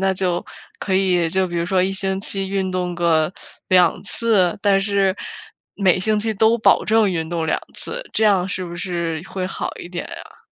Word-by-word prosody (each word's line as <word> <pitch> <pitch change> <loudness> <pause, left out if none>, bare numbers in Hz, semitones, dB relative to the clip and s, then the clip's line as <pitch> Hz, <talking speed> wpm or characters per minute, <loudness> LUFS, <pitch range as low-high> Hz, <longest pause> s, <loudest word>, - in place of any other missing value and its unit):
那 190 0 +2
就 180 -2 -1 0.3
可 190 - -1
以 180 -3 +2
就 190 +3 +1
比 175 -1 -5
如 170 - 0
说 185 0 +2
1 190 - +1
星 190 0 -2
期 195 -1 -2
运 190 -1 -1
动 180 -1 -2
个 170 -1 +2 0.3
2 180 -2 +4
次， 200 -4 +1
但 200 -1 +4
是 195 -1 +1 0.6
每 190 -3 +3
星 215 +2 +2
期 220 +1 0
都 220 +2 +3
保 - - +4
证 220 -2 +3
运 165 -3 -2
动 170 -1 -2
2 160 - 0
次。 - - -6
这 220 - +1
样 195 -3 +3
是 185 -2 -3
不 175 -1 -7
是 170 -3 -3
会 185 -1 -3
好 190 - -4
一 - - -8
点 175 0 -5
呀？ - - -11
190 Hz, 200 characters per minute, -21 LUFS, 175-200 Hz, 0.6 s, 2